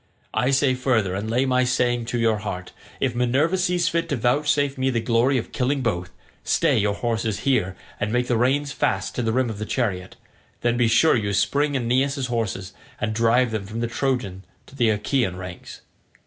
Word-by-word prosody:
I 125 +4 +1
say 135 -1 +3
further, 120 -7 +1
and 100 +3 -3
lay 125 +4 +2
my 130 -1 +2
saying 120 -1 +1
to 120 - -2
your 115 -2 +2
heart—if 100 +5 -5
Minerva 130 +8 +1
sees 180 -2 +1
fit 165 0 -1
to 145 - 0
vouchsafe 140 +3 +1
me 130 0 0
the 120 -3 0
glory 115 +4 +2
of 120 - -4
killing 135 +2 0
both, 90 -8 -2 0.3
stay - - +2
your 100 0 +1
horses 115 -3 -2
here 110 -9 +1 0.2
and 105 - -1
make 120 +1 +1
the 125 - 0
reins 135 +5 +1
fast 95 -7 -1
to - - -2
the 115 -1 0
rim 130 +2 +1
of 105 - -8
the - - -3
chariot; 95 -8 -2 0.5
then 120 0 +1
be 120 -1 +2
sure 120 +8 +4
you 100 -4 -1
spring 145 +8 +1
Aeneas' 130 +2 0
horses 110 -6 -3 0.3
and 110 - -1
drive 115 +2 +3
them 105 -3 -3
from 110 +2 -5
the 120 - 0
Trojan 115 -7 -2 0.2
to - - -16
the 120 -4 +2
Achaean 105 -1 0
ranks. 90 -1 -9
120 Hz, 195 wpm, -23 LUFS, 110-135 Hz, 0.5 s, sure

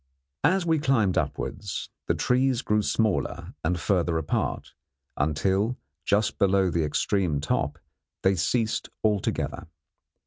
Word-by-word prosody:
As 180 +5 +3
we 160 -2 +2
climbed 115 -10 +2
upwards, 100 -6 -3 0.2
the - - +2
trees 130 0 +2
grew 105 0 +2
smaller 110 -1 0
and 85 +2 0
further 85 -1 +1
apart, 80 -2 -2 0.4
until, 95 - +1 0.3
just 105 +1 +1
below 95 -2 +3
the 85 -1 +1
extreme 80 +1 0
top, 75 - -1 0.5
they 95 - +4
ceased 110 +5 0
altogether. 105 -3 0
100 Hz, 115 wpm, -26 LUFS, 90-115 Hz, 0.5 s, they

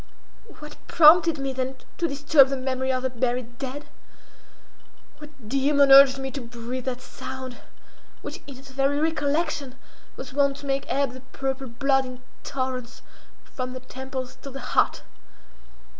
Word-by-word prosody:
What 300 0 -11
prompted 335 0 +6
me 270 -1 -3
then 260 0 -3 0.2
to 340 - +1
disturb 280 -1 +4
the 275 - -2
memory 260 0 -1
of 255 0 -1
the 260 - 0
buried 245 -1 -2
dead? 275 +2 -5 1.3
What 295 -6 -13
demon 275 +2 +3
urged 270 0 +9
me 270 0 -4
to 275 +1 -5
breathe 240 +1 -6
that 255 -1 -3
sound, 260 -1 -8 0.7
which - - -7
in 275 -3 -9
its 270 +1 -14
very 275 +2 +1
recollection 295 -3 -1 0.4
was 265 0 -9
wont 280 0 +2
to 285 - -11
make 275 0 -2
ebb 280 -2 +1
the 260 0 -11
purple 270 0 -3
blood 270 +2 +1
in 255 0 -10 0.2
torrents 255 -3 -4 0.4
from 255 -1 -6
the 255 - -6
temples 260 0 -7
to 275 - -8
the 270 0 -8
heart? - - +2
270 Hz, 155 wpm, -25 LUFS, 255-280 Hz, 1.3 s, urged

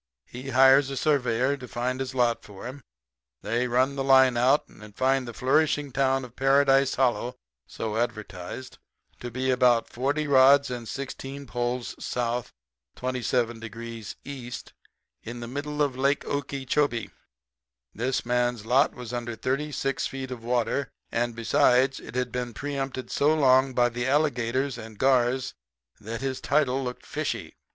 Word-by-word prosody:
He 125 - -8
hires 135 +1 +6
a 135 - -4
surveyor 130 -3 +2
to 125 -2 -9
find 125 +2 -2
his 130 0 -4
lot 120 -2 +2
for 100 0 -11
him. 130 +3 -7 0.6
They 120 +4 0
run 130 +3 +2
the 135 - -1
line 130 -2 +6
out 130 +5 +3
and 105 -1 -15
find 130 -1 +2
the - - -5
flourishing 145 +3 +1
town 135 0 +1
of 120 0 -15
Paradise 135 0 +4
Hollow, 125 -1 +1 0.3
so 110 -1 -4
advertised, 110 +1 -4 0.4
to 120 - -6
be 130 +2 -1
about 125 -2 +3
40 140 +5 -1
rods 140 0 +5
and 120 -2 -5
16 140 +1 -6
poles 120 0 -2
S., 120 0 -2 0.4
27 125 -2 -1
degrees 115 -1 -7
E. 130 -3 -7 0.8
of 120 +1 -6
the 120 - -6
middle 145 +3 -2
of 140 -3 -1
Lake 140 +2 +1
Okeechobee. 140 -2 -1 0.8
This 125 +4 -1
man's 120 -2 0
lot 130 +5 +3
was 125 -1 -8
under 120 -1 -3
thirty 140 +6 -2
six 135 -1 -1
feet 130 -1 -6
of 120 -2 -7
water, 125 +3 0 0.2
and, 120 0 -1
besides, 125 +3 +3
had 125 0 -3
been 125 -2 -4
preempted 135 -2 -4
so 150 +2 +3
long 130 -3 +4
by 120 -1 +4
the 120 +1 -3
alligators 135 -2 +1
and 110 -1 -10
gars 130 0 +2 0.5
that 110 +3 -6
his 135 -1 -3
title 135 -3 +1
looked 125 -1 -6
fishy. - - -3
130 Hz, 150 wpm, -26 LUFS, 120-135 Hz, 0.8 s, hires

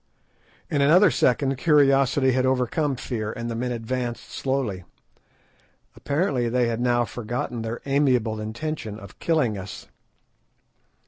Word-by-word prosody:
In 145 - 0
another 170 +6 +6
second 135 +2 +1
curiosity 140 -3 +4
had 130 0 +1
overcome 130 +3 +1
fear, 115 -4 -4
and 115 +1 -5
the - - -3
men 125 +2 -2
advanced 120 +1 -4
slowly. 130 -9 -2 1.1
Apparently 140 -5 0
they 120 0 +1
had 115 0 -2
now 120 -1 +2
forgotten 120 +1 -4
their 115 +1 -4
amiable 125 -6 +1
intention 110 -1 -5
of 100 - -13
killing 125 -11 +1
us. 95 +1 -8
125 Hz, 125 wpm, -24 LUFS, 115-140 Hz, 1.1 s, another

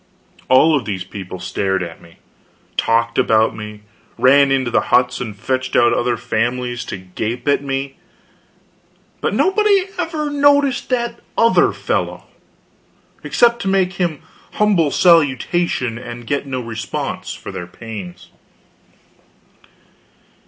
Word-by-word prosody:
All 150 +5 +5
of 135 - -1
these 95 -4 -3
people 95 0 -8
stared 95 0 -1
at 85 -2 -9
me, 85 - -18 0.6
talked 115 0 +1
about 110 0 +3
me, 105 -1 -8 0.4
ran 140 +1 +5
into 130 -3 +1
the - - +3
huts 125 0 +2
and 110 -4 -5
fetched 130 +4 -2
out 120 0 +5
their 120 -1 0
families 120 +2 -2
to - - -5
gape 105 +8 -5
at 145 0 +2
me; 135 0 -3 1.2
but - - -1
nobody 395 -1 +3
ever 315 -3 -2
noticed 285 -2 +3
that 235 -2 -1 0.2
other 230 0 +4
fellow, - - -2 1.0
except 235 -1 +2
to 195 - -3
make 190 -1 +2
him 165 -5 -1 0.3
humble 200 -8 +2
salutation 145 -5 +2
and 120 -1 -8
get 140 +2 -2
no 130 -2 -3
response 115 -2 -5
for - - -9
their 90 - -6
pains. 90 -3 -9
130 Hz, 125 wpm, -18 LUFS, 110-175 Hz, 1.2 s, All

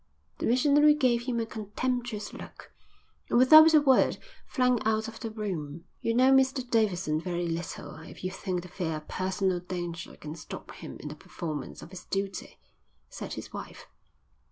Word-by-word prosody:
The - - -1
missionary 290 +4 +5
gave 250 -4 +1
him 240 -2 0
a 230 - -1
contemptuous 225 0 -3
look - - -11 0.6
and - - +3
without 310 +5 +9
a 305 - +7
word 270 -3 +4 0.3
flung 250 -3 +2
out 220 +1 +1
of 225 0 -9
the 225 - -4
room. 170 -8 -5 0.2
"You 230 - 0
know 260 +2 +5
Mr 265 -1 +3
Davidson 190 -9 +1
very 175 -1 -2
little 165 0 -5
if 160 +4 -12
you 185 - -2
think 185 -2 -3
the - - -9
fear 170 -3 -3
of 155 0 -8
personal 185 -1 -1
danger 175 -2 -6
can 150 0 -7
stop 165 - -9
him - - -9
in - - -6
the - - -7
performance 155 -5 -6
of 170 - -12
his 185 -2 -10
duty," 195 0 -4 0.5
said - - -6
his - - -8
wife. - - -8
210 Hz, 175 wpm, -28 LUFS, 175-250 Hz, 0.6 s, without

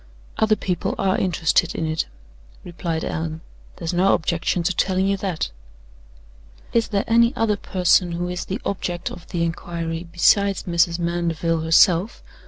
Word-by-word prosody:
"Other 220 0 +4
people 185 -3 -2
are 190 -1 +1
interested 170 -1 +1
in 160 - -2
it," 155 0 -1 0.6
replied 170 -2 -4
Allan. 160 0 -4 0.3
"There's 165 0 -4
no 185 +3 +4
objection 170 +2 -1
to 180 +1 0
telling 190 +1 +1
you 200 0 +2
that." 185 - -3 1.2
"Is 230 -1 +2
there 200 -2 0
any 235 +2 +4
other 220 -2 +1
person 180 -3 +2
who 175 +1 -2
is 180 0 -4
the 195 +4 -4
object 180 -2 -3
of 175 - -11
the 170 -1 -2
inquiry 165 0 -4
besides 200 +3 +3
Mrs. 170 -1 +1
Mandeville, 170 -1 -1
herself?" 170 +5 +3
175 Hz, 150 wpm, -22 LUFS, 165-195 Hz, 1.2 s, Other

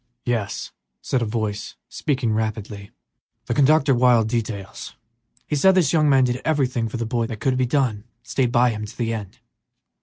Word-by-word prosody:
"Yes," 115 -5 -2 0.3
said 130 - 0
a - - 0
heavy - - -5
voice, 110 -2 -3
speaking 130 -6 -1
rapidly, 110 -2 -3 0.6
"the - - -1
conductor 145 0 +4
wired 120 -3 +4
details; 110 -4 -4 0.5
he 150 - -2
said 190 +6 +4
this 175 -6 +3
young 155 -2 +4
man 135 -2 +5
did 125 0 -1
everything 130 -7 0
for 115 - -5
the 115 - -2
boy 115 0 -1
that 110 - -6
could 130 +2 +1
be 130 -1 +1
done, 130 -5 +1
and 100 - -15 0.2
stayed 125 -1 0
by 120 0 +4
him 110 -1 -5
to 105 - -13
the 115 -2 -1
end." 105 -4 -6
120 Hz, 190 wpm, -22 LUFS, 110-135 Hz, 0.6 s, man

